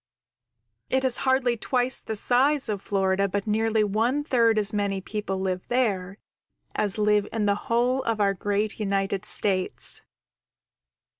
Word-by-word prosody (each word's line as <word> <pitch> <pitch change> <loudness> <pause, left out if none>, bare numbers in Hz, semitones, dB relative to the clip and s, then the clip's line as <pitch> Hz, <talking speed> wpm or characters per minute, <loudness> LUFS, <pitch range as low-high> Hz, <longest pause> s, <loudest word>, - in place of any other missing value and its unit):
It 265 0 +1
is 255 -2 +3
hardly 255 -2 +2
twice 250 +2 0
the 220 - -5
size 260 +6 +4
of 205 -2 -2
Florida, 195 0 0
but 200 +1 -3
nearly 220 0 +1
one 230 +8 0
third 230 -6 +2
as 210 -1 +1
many 200 -2 -1
people 200 0 -4
live 185 -1 -3
there 200 -6 -1 0.6
as 205 -1 -1
live 210 -1 +2
in 220 -2 -1
the 200 - +3 0.2
whole 245 +3 +1
of 230 -3 -2
our 200 -1 +2
great 205 +3 -2
United 195 -2 -1
States. 190 -3 0
210 Hz, 145 wpm, -25 LUFS, 200-240 Hz, 0.6 s, size